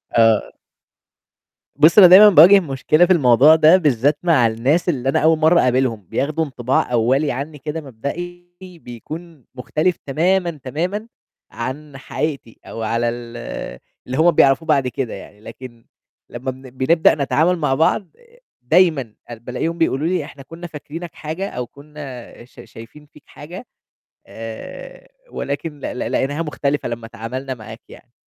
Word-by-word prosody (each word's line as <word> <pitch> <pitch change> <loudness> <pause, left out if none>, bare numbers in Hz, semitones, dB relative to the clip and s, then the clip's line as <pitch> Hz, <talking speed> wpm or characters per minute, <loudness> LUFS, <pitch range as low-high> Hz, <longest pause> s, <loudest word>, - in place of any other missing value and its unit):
آآ 115 -2 +4 1.3
بُصي 155 +8 +5
أنا 180 - +10
دايمًا 200 +4 +9
باواجه 185 +3 +8
مشكلة 155 +1 +1
في 185 - +3
الموضوع 140 0 +5
ده 160 +3 +6
بالذات 145 -3 +1
مع 155 -10 +3
الناس 135 +11 0
اللي 135 -5 -1
أنا - - +1
أوّل 160 +1 +3
مرّة 160 +2 +4
اقابلهم، 125 -5 0
بياخدوا 155 +3 -1
انطباع 130 -2 -1
أوّلي 130 +5 +1
عنّي 145 +4 -6
كده 150 +3 -5
مبدئي 175 +7 -7 0.3
بيكون 155 +4 -10
مختلف 155 +7 -1
تمامًا، 175 +5 0
تمامًا 180 - -4 0.4
عن 135 +4 -7
حقيقتي 140 -3 -5
أو 115 - -8
على 115 +2 0
ال 120 0 -8 0.7
اللي 130 +1 -4
هُم 165 +3 +4
بيعرفوا 145 +1 +3
بعد 140 -5 +2
كده 125 -1 -4
يعني، 105 - -12
لكن 120 0 -12 0.4
لمّا 130 +2 -5
بن 130 0 -13
بنبدأ 135 +6 +2
نتعامل 160 +5 +1
مع 150 -5 0
بعض 165 +5 +1 0.5
دايمًا 145 - +2 0.2
آآ 120 - -6
بالاقيهم 125 +9 -4
بيقولوا 160 -2 0
لي 175 -3 -1
إحنا 140 -1 -13
كنّا 170 +4 -10
فاكرينك 165 +2 -9
حاجة 165 +6 -5
أو 125 -1 -5
كنّا 140 -5 -11
ش - - -20
شايفين 120 +6 -14
فيك 150 - -18
حاجة 175 +10 -11 0.6
آآ 115 - -10 0.2
ولكن 145 +2 -5
ل 125 - -6
ل - - -3
لقيناها 145 +4 -1
مختلفة 145 -3 -2
لمّا 115 -1 -6
اتعَاملنا 125 +5 -6
معاك 110 -1 -11
يعني. 120 - -16
145 Hz, 150 wpm, -19 LUFS, 125-165 Hz, 1.3 s, أنا